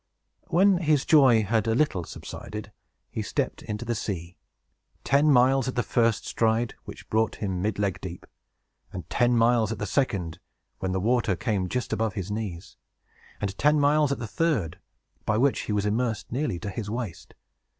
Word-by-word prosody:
When 185 +2 +4
his 150 -4 +2
joy 130 -8 +6
had 110 +1 0
a 115 - +2
little 120 - +1
subsided, 105 +5 -8 0.4
he - - -3
stepped - - -2
into 105 +2 -5
the 120 - -1
sea; 90 -5 -4 0.7
ten 145 +3 +3
miles 130 -1 +4
at 130 - -3
the 120 - +1
first 115 -2 +1
stride, 115 +1 +1
which - - -10
brought 110 0 +1
him 95 -4 -3
midleg 100 -1 -1
deep; - - -7 0.7
and - - -7
ten 120 0 +3
miles 115 -1 +3
at 115 - -3
the 105 - -3
second, 95 - -1 0.4
when 95 - -2
the 95 - 0
water 110 -1 +1
came 100 -4 -1
just 125 +4 -2
above 110 -2 -1
his 95 -1 -4
knees; 100 -5 -5 0.6
and 100 -1 -3
ten 150 +1 +4
miles 145 +1 +3
more 140 - +1
at - - -13
the 120 - -4
third, 120 - -1 0.4
by 110 - +1
which 135 +3 +2
he - - -3
was 105 -1 0
immersed 110 +1 -1
nearly 130 -6 -1
to 100 +3 -5
his 105 +2 -5
waist. 110 -7 -6
115 Hz, 180 wpm, -26 LUFS, 100-130 Hz, 0.7 s, joy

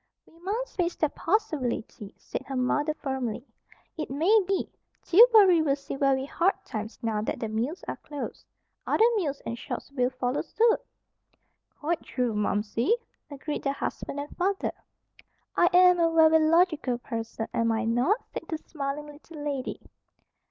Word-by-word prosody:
"We 330 - -22
must 425 +8 -3
face 350 -1 0
that 305 -2 0
possibility," 305 - -2
said - - -5
her 270 - -4
mother 290 +4 +1
firmly. 260 -4 -3 0.5
"It 310 - -4
may 320 +11 +3
be. 390 -1 0 0.4
Tillbury 405 -4 +7
will 280 -3 +2
see 275 -1 -7
very 270 -1 +2
hard 350 +7 +1
times 215 0 -5
now 220 -2 0
that 215 - -3
the 225 - -2
mills 235 - -3
are - - -4
closed. 290 -2 -7 0.4
Other 445 - +4
mills 290 -8 -2
and 230 - -3
shops 235 - -6
will 250 -3 +1
follow 255 0 -2
suit." 455 0 +2 1.0
"Quite 325 +3 -1
true, 245 -3 -2
Momsey," 210 - +1 0.3
agreed 290 +1 -5
the 275 - 0
husband 280 0 -4
and 290 +1 -7
father. 385 +2 0 0.8
"I 350 - +5
am 360 0 +6
a 330 -1 +3
very 320 0 +6
logical 320 -7 +3
person, 225 -2 -5
am 230 0 +1
I 225 +1 0
not?" 245 - +1
said - - -5
the 320 - -2
smiling 295 -1 -5
little 295 +1 -11
lady. 280 -3 -3
290 Hz, 155 wpm, -27 LUFS, 250-345 Hz, 1.0 s, Tillbury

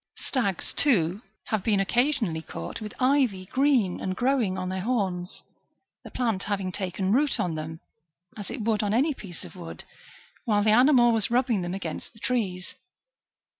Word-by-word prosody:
Stags, 200 -9 -1
too, 195 - +2 0.3
have 215 -4 0
been 210 -3 +2
occasionally 235 - +1
caught 85 - -7
with 210 -1 -5
i\'y 255 -8 +2
green 255 -9 +2
and 185 -1 -2
growing 245 -5 +1
on 185 0 -3
their 190 0 -3
horns,^ 190 -6 -2 0.6
the - - -9
plant 225 -6 -1
having 195 -3 -2
taken 190 0 -2
root 285 +3 +2
on 175 -2 0
them, 160 +1 -5 0.6
as 205 -3 -7
it - - -4
woidd 215 -1 +1
on 210 0 0
any 290 +6 +3
piece 190 -9 -9
of - - -12
wood, 170 -2 -7 0.6
while 210 -3 +2
the 215 - +4
animal 245 +1 +6
was 225 -3 +1
rubbing 240 -4 +2
them 175 +1 -3
against 170 0 -6
the 220 - -12
trees. 195 -8 -2
210 Hz, 170 wpm, -26 LUFS, 185-245 Hz, 0.6 s, animal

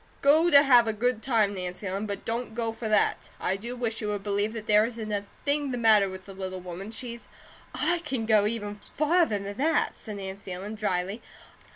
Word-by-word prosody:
Go 310 +5 +5
to 285 -3 +8
have 245 -5 +6
a 220 - +1
good 235 +1 0
time, 220 -6 +2
Nancy 180 +1 -5
Ellen; 195 +3 -2
but 200 -1 -5
don't 230 0 -3
go 230 -1 -1
for 225 -1 -5
that. 215 - +2
I 190 - 0
do 235 +5 -6
wish 235 -2 -3
you 210 - -2
would 205 -1 -2
believe 205 +1 0
that 220 -2 -6
there 210 0 +5
isn't 225 -2 -4
a 205 -1 -2 0.2
thing 285 0 +1
the 250 - -2
matter 215 -4 +5
with 190 0 -9
the 195 - -10
little 185 -1 -5
woman, 180 +3 -7
she's 235 +1 -7 0.3
" - - -17 0.2
"I 350 - +1
can 265 -8 -3
go 215 -2 +4
even 210 -2 -3 0.2
farther 315 - +3
than 200 +1 -6
that," 310 +3 +1
said 215 -2 -8
Nancy 190 -1 -6
Ellen, 195 +4 -6
dryly. 200 0 -2
215 Hz, 220 wpm, -27 LUFS, 200-240 Hz, 0.3 s, to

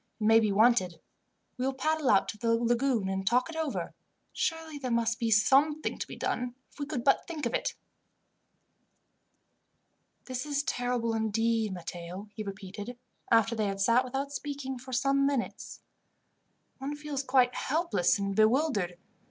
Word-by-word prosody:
It - - -4
may 225 +1 +6
be 215 -2 +1
wanted. 205 -4 +3 0.6
We 250 - -1
will 270 - -2
paddle 310 +1 0
out 195 - +4
to 215 - -5
the 230 0 +2
lagoon 235 -2 +1
and 190 0 -2
talk 250 +9 +2
it - - -9
over. 320 -3 -3 0.4
Surely 325 -3 -2
there 260 -2 -3
must 235 -1 +1
be 230 -2 0
something 275 +8 +3
to - - -3
be - - -8
done, 250 0 -2 0.2
if - - -20
we 285 - -3
could 280 -6 -3
but 275 - +3
think 315 -5 -4
of 235 - -1
it. - - -1 2.5
"This 255 -1 -4
is 285 -1 0
terrible, 245 -3 -1
indeed, 225 0 +1
Matteo," 180 +2 -7
he 215 - -6
repeated, 200 +3 -7 0.3
after 225 0 +4
they 215 -2 0
had 195 0 -3
sat 230 +6 +4
without 270 +2 -3
speaking 280 -3 -5
for 260 +1 -10
some 275 +2 +2
minutes. 275 -4 -3 1.0
"One 275 +2 -4
feels 295 -2 -4
quite 255 -2 +3
helpless 310 - +1
and 200 -1 -2
bewildered. 215 - +2
245 Hz, 160 wpm, -29 LUFS, 215-275 Hz, 2.5 s, may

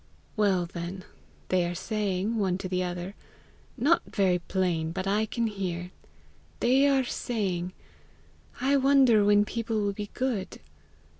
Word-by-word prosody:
"Well 195 -5 +2
then, 175 +2 -6 0.5
they 185 -1 +3
are 175 0 -2
saying, 205 +2 -1
one 185 -3 +1
to 190 - -5
the 185 0 -1
other 180 +1 -4 0.6
not 305 +7 +3
very 185 -3 +2
plain, 170 -3 -1
but 185 +2 -3
I 210 +3 +1
can 235 +2 -1
hear 180 -4 -3 0.7
they 265 +4 +4
are 270 -2 +3
saying, 185 -8 -2 0.9
'I 275 +2 +3
wonder 265 -5 +5
when 205 0 +5
people 225 0 -2
will 205 -1 0
be 205 0 -6
good! 245 -7 -2
200 Hz, 140 wpm, -28 LUFS, 180-230 Hz, 0.9 s, wonder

